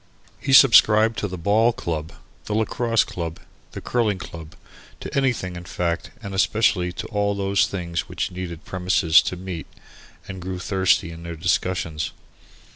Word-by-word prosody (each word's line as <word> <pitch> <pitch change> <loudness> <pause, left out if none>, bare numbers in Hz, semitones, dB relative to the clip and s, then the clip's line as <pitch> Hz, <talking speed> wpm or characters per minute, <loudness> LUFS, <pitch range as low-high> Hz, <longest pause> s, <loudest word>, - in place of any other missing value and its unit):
He 135 - -3
subscribed 115 -4 +6
to 105 - -2
the 90 -1 -6
Ball 105 +7 +3
Club, 80 -5 -4 0.3
the 105 - -2
Lacrosse 115 +1 +1
Club, 85 -2 -6 0.3
the - - -6
Curling 110 -5 0
Club, 80 -2 -10 0.4
to - - -7
anything, 125 -10 0
in 85 0 -8
fact, 85 0 -2
and 100 -2 -6
especially 95 -2 +2
to - - -6
all 100 -2 0
those 100 0 +1
things 85 -3 -4
which - - -3
needed 90 -3 -7
premises 90 -3 +3
to - - -4
meet 90 -2 -7 0.6
in 95 - -7
and - - -9
grew 90 +1 -4
thirsty 95 -2 +1
in 85 0 -10
their 85 0 -6
discussions. 80 -2 -1
95 Hz, 160 wpm, -23 LUFS, 85-105 Hz, 0.6 s, subscribed